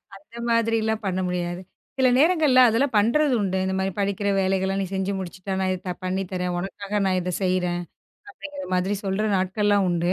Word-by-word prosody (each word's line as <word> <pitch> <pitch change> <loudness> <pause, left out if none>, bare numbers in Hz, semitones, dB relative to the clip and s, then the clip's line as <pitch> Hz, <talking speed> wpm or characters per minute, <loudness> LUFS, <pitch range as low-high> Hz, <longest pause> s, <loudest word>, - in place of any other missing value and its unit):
அந்தமாதிரியிலாம் 225 0 -1
பண்ணமுடியாது. 180 -1 -2 0.4
சில 260 -1 +4
நேரங்கள்ல 305 -3 +4
அதெல்லாம் 235 +2 +1
பண்றது 260 +7 +3
உண்டு. 190 -1 -1
இந்தமாரி 190 0 -1
படிக்கிற 200 0 -1
வேலைகள்லாம் 190 +1 0
நீ 195 - -1
செஞ்சு 190 +1 -1
முடிச்சிட்டேன்னா, 190 +1 -4
இத 185 - -4
த - - -1
பண்ணித்தர்றேன், 185 -1 -2
உனக்காக 200 +3 -3
நான் 185 -1 +2
இத 180 +1 -3
செய்றேன். 180 -1 0 0.5
அப்பிடிங்கிறமாதிரி 205 - -3
சொல்ற 195 +2 -1
நாட்கள்லாம் 200 +1 +1
உண்டு. 175 +1 +1
195 Hz, 140 wpm, -24 LUFS, 185-220 Hz, 0.5 s, சில